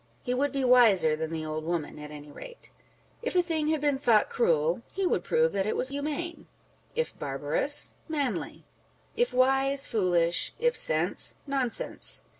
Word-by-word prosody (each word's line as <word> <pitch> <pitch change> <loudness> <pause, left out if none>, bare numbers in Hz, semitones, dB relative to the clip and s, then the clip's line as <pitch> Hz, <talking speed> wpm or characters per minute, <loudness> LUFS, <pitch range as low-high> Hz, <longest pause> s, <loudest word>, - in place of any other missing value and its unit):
He 250 - -2
would 280 +3 0
be 275 -1 -2
wiser 210 -11 +5
than 160 0 -4
the 160 -1 -5
old 155 0 -4
woman 165 -2 -4
at 150 0 -9
any 150 -1 -11
rate. 485 - -12 0.5
If 475 -5 -4
a 360 - +4
thing 320 -3 -2
had 315 0 +1
been 290 -2 0
thought 230 -6 +3
cruel, 165 -3 +1
he 385 0 -2
would - - 0
prove 475 +1 +1
that 195 - -1
it - - -1
was 255 - 0
humane; 300 +4 -5 0.5
if 480 0 -3
barbarous, - - +2
manly; 290 -5 -3 0.5
if 485 - +1
wise, 270 +2 +2
foolish; 175 -5 +1
if 485 +2 +1
sense, - - +1
nonsense. 270 -4 +2
260 Hz, 165 wpm, -27 LUFS, -, 0.5 s, wiser